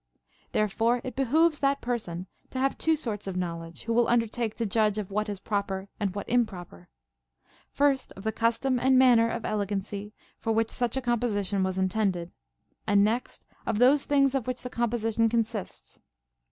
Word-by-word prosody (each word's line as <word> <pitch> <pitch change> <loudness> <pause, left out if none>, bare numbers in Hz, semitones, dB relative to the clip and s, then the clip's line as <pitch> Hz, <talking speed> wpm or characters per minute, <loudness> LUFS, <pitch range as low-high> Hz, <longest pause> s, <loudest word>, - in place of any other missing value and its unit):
Therefore 225 +3 +1
it 255 -3 -6
behooves 300 +5 +3
that 275 0 +2
person 185 -8 -3 0.2
to - - -7
have 270 +1 +1
two 320 0 +2
sorts 215 -9 -4
of 185 -1 -3
knowledge, 170 -2 -5
who 230 - -1
will 235 0 +3
undertake 230 -1 0
to 230 - -2
judge 215 0 +1
of 205 -2 -4
what 210 +2 -1
is 200 -2 -4
proper 200 -1 -3
and 200 -3 -1
what 200 - -4
improper; 180 - -2 0.8
first, 280 -2 +1
of 195 - -11
the 220 - 0
custom 230 +3 +1
and 260 +1 +4
manner 240 -3 +6
of 230 -1 -4
elegancy 205 0 -3 0.3
for 225 - -1
Λvhich 225 0 +1
such 245 +1 -1
a - - 0
composition 215 -5 0
Avas 190 0 -1
intended, 190 -2 0 0.6
and 200 -1 +5
next 230 +4 -2 0.2
of 225 - 0
those 265 +5 +5
things 275 -2 +3
of 265 -4 -1
which 255 0 -3
the 250 - -6
composition 230 -1 +1
consists. 220 - -3
225 Hz, 175 wpm, -27 LUFS, 200-245 Hz, 0.8 s, manner